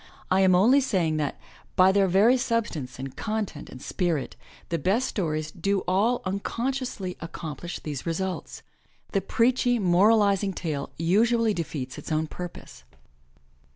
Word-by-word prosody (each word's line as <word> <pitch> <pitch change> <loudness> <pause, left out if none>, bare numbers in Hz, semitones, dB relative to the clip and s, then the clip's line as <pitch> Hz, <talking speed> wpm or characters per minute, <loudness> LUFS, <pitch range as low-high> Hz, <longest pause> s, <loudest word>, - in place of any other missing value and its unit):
I 190 +1 +4
am 185 -1 +5
only 245 +10 +5
saying 180 -11 0
that, 150 -2 -2 0.4
by 185 0 +6
their 195 0 +3
very 200 +7 +5
substance 210 - -2
and 135 0 -7
content 215 -8 -4
and 130 - -10
spirit, 165 -1 -2 0.3
the 170 - -1
best 205 - +1
stories 155 -5 -2
do 195 +3 0
all 205 +7 +1
unconsciously 220 0 -3
accomplish 165 0 -6
these 145 -4 -5
results. 185 +2 -3 0.5
The 195 - +1
preachy, 245 +4 +2
moralizing 200 +1 +3
tale 155 -6 -3
usually 220 +6 +3
defeats 145 -7 -4
its - - -8
own 155 +1 +1
purpose. 175 +2 -9
185 Hz, 135 wpm, -26 LUFS, 160-220 Hz, 0.5 s, by